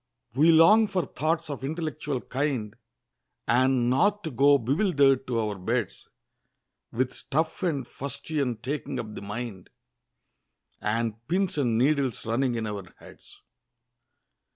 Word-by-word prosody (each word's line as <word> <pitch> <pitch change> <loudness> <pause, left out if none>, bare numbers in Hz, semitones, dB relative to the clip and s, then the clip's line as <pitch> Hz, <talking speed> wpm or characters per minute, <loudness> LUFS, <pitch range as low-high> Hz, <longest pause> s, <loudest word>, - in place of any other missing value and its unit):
We 155 +6 +5
long 210 +8 +6
for 190 -4 -1
thoughts 160 +4 -1
of 140 -3 -6
intellectual 150 -3 -3
kind, 130 -6 -2 0.7
And 125 0 +3
not 200 +12 +2
to 160 - -4
go 140 +3 +5
bewilder'd 140 - +2
to 120 -2 0
our 105 -3 -2
beds; 90 - -3 0.8
With 130 +2 -1
stuff 160 +3 -2
and 150 -8 -1
fustian 140 -2 -3
taking 140 +3 -3
up 110 -2 -6
the - - -7
mind, 105 -2 -6 1.1
And 115 +1 0
pins 185 +2 0
and 120 -5 +1
needles 135 -1 +1
running 120 +2 0
in 115 -1 -2
our 100 -4 -6
heads! - - -16
135 Hz, 130 wpm, -27 LUFS, 115-155 Hz, 1.1 s, long